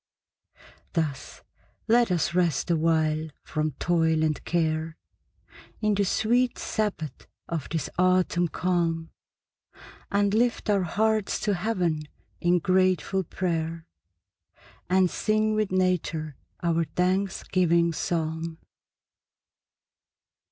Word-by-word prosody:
Thus 155 -6 -3 0.4
let 235 0 +4
us 170 -1 0
rest 175 -2 +1
awhile 160 -1 +1 0.2
from 155 -1 -2
toil 160 +1 +1
and 155 -1 0
care, 160 -1 -1 0.8
In 215 -1 +1
the 200 0 +1
sweet 240 +6 +1
sabbath 195 - -3 0.2
of 165 -5 -4
this 160 -3 -2
autumn 180 -1 +3
calm, 170 -2 -1 1.0
And 200 0 +2
lift 230 -1 +1
our 200 -2 +3
hearts 215 +4 0
to 210 - +1
heaven 180 -5 0 0.4
in 175 +1 +3
grateful 185 +1 +2
prayer, 165 -2 -3 1.0
And 185 0 +4
sing 215 +3 +1
with 215 -2 0
nature 175 -5 0 0.3
our 165 -1 +2
thanksgiving 180 -1 +1
psalm. 160 0 -2
175 Hz, 95 wpm, -26 LUFS, 160-195 Hz, 1.0 s, let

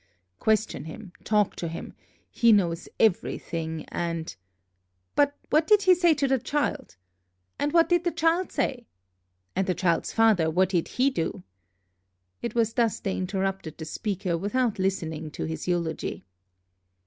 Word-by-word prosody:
question 220 -6 +1
him, 180 +4 -9
talk 210 -2 +2
to 170 - -4
him, 165 - -7 0.4
he 235 -1 +4
knows 175 -5 +2
everything, 165 -6 0
and 165 -1 -3 0.4
" 90 0 -48
"But 285 0 +3
what 310 +2 +3
did 420 -2 +5
he 370 -1 +7
say 345 -2 +4
to 280 - +1
the 265 -1 +2
child?" 290 +2 -2 0.6
"And 290 - 0
what 335 0 +5
did 350 0 +2
the 345 - +1
child 330 +3 +1
say?" 245 -3 -2 0.7
"And 190 +1 0
the 185 - +1
child's 170 -3 +1
father, 215 -8 +4
what 180 +3 +2
did 175 -4 0
he 265 +2 +1
do?" 180 -3 -3 1.0
It 235 - -4
was 225 -1 +2
thus 230 -3 +1
they 195 - -2
interrupted 190 -3 -2
the 160 - -6
speaker, 190 0 -2
without 215 +3 0
listening 160 -5 -2
to - - -4
his 160 +1 -5
eulogy. 170 - -2
195 Hz, 155 wpm, -26 LUFS, 170-260 Hz, 1.0 s, he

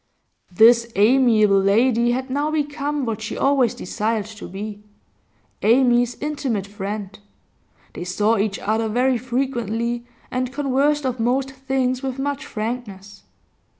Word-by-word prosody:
This 230 +4 +5
amiable 215 -2 +4
lady 235 +4 +3
had 260 +2 -2
now 290 +3 0
become 295 -2 -2
what 225 -1 -3
she 220 - -5
always 265 -4 +2
desired 215 0 -2
to 215 -1 -10
be, 205 +2 -7 0.8
Amy's 245 +1 +3
intimate 280 -9 -2
friend; 205 0 -6 0.7
they - - -6
saw 205 +5 +1
each 200 -1 0
other 220 +1 -1
very 250 +2 +1
frequently, 240 -2 -2 0.2
and 255 0 -2
conversed 285 +1 +1
of 255 -1 -2
most 260 +4 0
things 260 -1 -1
with 265 -1 -4
much 280 +1 -3
frankness. 210 -3 -6
240 Hz, 125 wpm, -22 LUFS, 215-265 Hz, 0.8 s, This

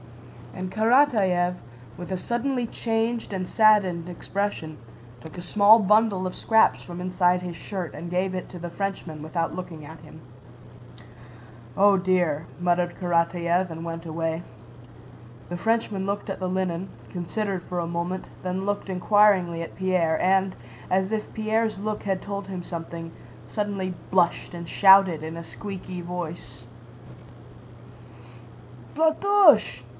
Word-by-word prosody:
And 185 0 -5
Karatáev, 215 -7 +3 0.4
with 175 +2 -8
a 185 - -1
suddenly 240 +4 -1
changed 225 0 -2
and 185 -1 -3
saddened 195 -6 +3
expression, 175 -4 -4 0.4
took 160 +5 -11
a - - -5
small 205 +5 +6
bundle 210 -2 +3
of 185 - -6
scraps 220 -1 +3
from 175 -1 -8
inside 180 0 +1
his 180 -2 -6
shirt 180 0 -5
and 170 - -7
gave 185 +1 0
it 185 - -5
to 180 - -9
the 175 +1 -5
Frenchman 180 -4 -4
without 165 +2 -2
looking 165 -4 -7
at 160 +2 -11
him. 155 0 -14 1.6
"Oh 200 0 +6
dear!" 175 -5 +1
muttered 175 0 +1
Karatáev 175 0 +1
and 165 +1 -6
went 165 0 -6
away. 165 0 -2 1.1
The 175 - -4
Frenchman 225 -2 0
looked 200 +1 -3
at 195 - -4
the 185 -1 -2
linen, 185 -1 -2 0.2
considered 190 +1 -3
for 180 0 -4
a 170 - -2
moment, 175 +2 -3 0.2
then 185 +1 -2
looked 205 -1 -2
inquiringly 185 -2 +3
at 165 - -7
Pierre 180 -4 +1
and, 190 0 +2 0.3
as 190 +2 +1
if 215 -1 -3
Pierre's 220 -1 0
look 210 +1 -3
had 190 -2 -1
told 200 -1 -5
him 185 -2 -5
something, 165 -1 -7 0.3
suddenly 200 -3 -3 0.2
blushed 180 -2 +1
and 170 -1 -7
shouted 190 -5 +6
in 160 +1 -6
a 170 - -6
squeaky 185 0 -7
voice: 170 -8 -7 2.3
"Platoche! 320 - +4
185 Hz, 140 wpm, -25 LUFS, 170-205 Hz, 2.3 s, small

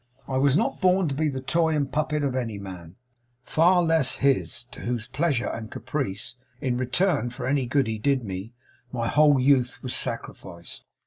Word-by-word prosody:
I 130 - -1
was 140 +2 +4
not - - -1
born 185 -1 +4
to - - -2
be 155 +2 0
the 135 -2 -3
toy 160 +2 +1
and 140 -3 -1
puppet 150 0 0
of 135 -2 -1
any 115 -5 -2
man, 90 -3 -9 0.5
far 175 +6 +4
less 160 -5 +3
his; 135 -2 +1
to - - -9
whose 120 -2 -2
pleasure 140 -2 0
and 110 -1 -6
caprice, 125 -4 -4 0.2
in 130 -4 -1
return 130 - +1
for 120 - -6
any 135 -1 +1
good 135 +2 +2
he 110 -1 -3
did 135 +2 +1
me, 95 +1 -6 0.4
my 115 -2 -2
whole 150 -1 +5
youth 130 -2 +3
was 130 - -1
sacrificed. 95 -7 -5
130 Hz, 185 wpm, -25 LUFS, 115-150 Hz, 0.5 s, whole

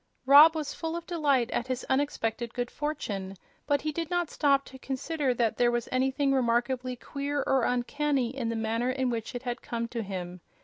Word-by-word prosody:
Rob 295 +4 +9
was 305 -2 -3
full 325 0 -4
of 340 -1 -5
delight 285 -9 +1
at 240 - -1
his 255 -1 -3
unexpected 240 -4 -1
good 245 0 -2
fortune; 205 -11 -4 0.3
but 285 -2 +2
he 305 - -2
did 330 +1 -4
not 350 -2 -1
stop 275 -2 +2
to 265 - -12
consider 275 +1 -2
that 230 -2 +1
there 240 -1 +4
was 240 -1 -1
anything 265 +2 +1
remarkably 250 0 0
queer 280 +3 -3
or 265 -2 +2
uncanny 265 0 0
in 240 -4 -2
the 230 - -2
manner 225 +2 -1
in 255 -1 0
which 230 +1 -4
it 245 - -5
had 245 -1 -3
come 235 -1 -3
to 235 -1 -3
him. 180 -3 -6
260 Hz, 195 wpm, -28 LUFS, 235-285 Hz, 0.3 s, Rob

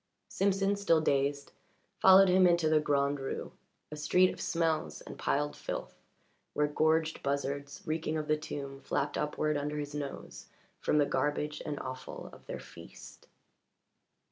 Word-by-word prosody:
Simpson, 195 0 +1
still 200 -5 +3
dazed, 140 -1 0 0.5
followed 190 +1 +8
him 185 0 +5
into 170 -2 +3
the 155 0 +4
Grand 140 -1 +1
Rue 135 - -4 0.4
a - - -5
street 180 +5 +3
of - - -9
smells 165 -2 0
and - - -9
piled 145 +1 -1
filth, - - -5 0.6
where 150 - +2
gorged 160 +2 +1
buzzards, 140 0 -3
reeking 155 0 -1
of 155 -1 -3
the 155 - +3
tomb, 140 -3 -6
flapped 140 +1 -1
upward 150 0 0
under 150 +1 -3
his 145 -1 -4
nose 145 -2 -6 0.3
from - - +1
the 145 - +5
garbage 150 +2 -1
and 145 -2 -3
offal 130 0 -7
of - - -16
their - - -5
feast. - - -13
150 Hz, 150 wpm, -31 LUFS, 140-160 Hz, 0.6 s, followed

